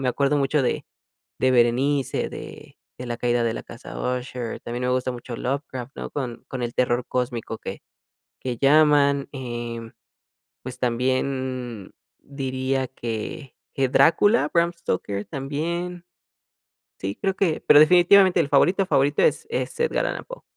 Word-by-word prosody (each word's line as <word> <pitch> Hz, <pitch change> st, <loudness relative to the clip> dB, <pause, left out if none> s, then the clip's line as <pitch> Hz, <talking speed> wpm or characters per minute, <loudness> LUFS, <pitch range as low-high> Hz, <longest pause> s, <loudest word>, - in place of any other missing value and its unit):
me 130 Hz, -, 0 dB
acuerdo 140 Hz, +3 st, +1 dB
mucho 140 Hz, +1 st, +1 dB
de 125 Hz, -, -1 dB, 0.6 s
de 130 Hz, 0 st, +3 dB
Berenice, 130 Hz, +3 st, +2 dB
de -, -, -10 dB, 0.2 s
de 125 Hz, -, -5 dB
La 120 Hz, -1 st, -3 dB
caída 120 Hz, 0 st, +1 dB
de 115 Hz, -, 0 dB
la -, -, -6 dB
Casa 120 Hz, -, -10 dB
Usher, 125 Hz, -2 st, -3 dB
también 120 Hz, +1 st, -5 dB
me 125 Hz, -, +1 dB
gusta 130 Hz, 0 st, 0 dB
mucho 120 Hz, 0 st, -7 dB
Lovecraft, 130 Hz, -1 st, -4 dB
no -, -, -6 dB
con 125 Hz, -5 st, -5 dB
con 130 Hz, -2 st, -4 dB
el 120 Hz, 0 st, -3 dB
terror 120 Hz, 0 st, +1 dB
cósmico 120 Hz, -3 st, -3 dB
que -, -, -7 dB, 0.6 s
que 125 Hz, -2 st, -3 dB
llaman, 140 Hz, 0 st, +4 dB
em, 120 Hz, -3 st, -5 dB, 0.7 s
pues 130 Hz, 0 st, -8 dB
también, 130 Hz, -2 st, -2 dB, 0.3 s
diría 130 Hz, -1 st, -2 dB
que 120 Hz, +3 st, -6 dB, 0.2 s
que 135 Hz, -2 st, +1 dB
Drácula, 205 Hz, -, +4 dB
Bram 170 Hz, 0 st, +3 dB
Stoker 100 Hz, -, -3 dB
también. 170 Hz, +5 st, -4 dB, 0.9 s
Sí, 95 Hz, +1 st, -3 dB
creo 195 Hz, -1 st, 0 dB
que 175 Hz, -6 st, 0 dB
pero 145 Hz, -, +8 dB
definitivamente, 180 Hz, +3 st, +6 dB
el 150 Hz, -, +2 dB
favorito, 180 Hz, +7 st, +3 dB
favorito 145 Hz, -4 st, +2 dB
es 450 Hz, -, +2 dB
es 470 Hz, -, -3 dB
Edgar 475 Hz, -, +1 dB
Allan -, -, -3 dB
Poe. -, -, -10 dB
130 Hz, 150 wpm, -24 LUFS, 120-150 Hz, 0.9 s, pero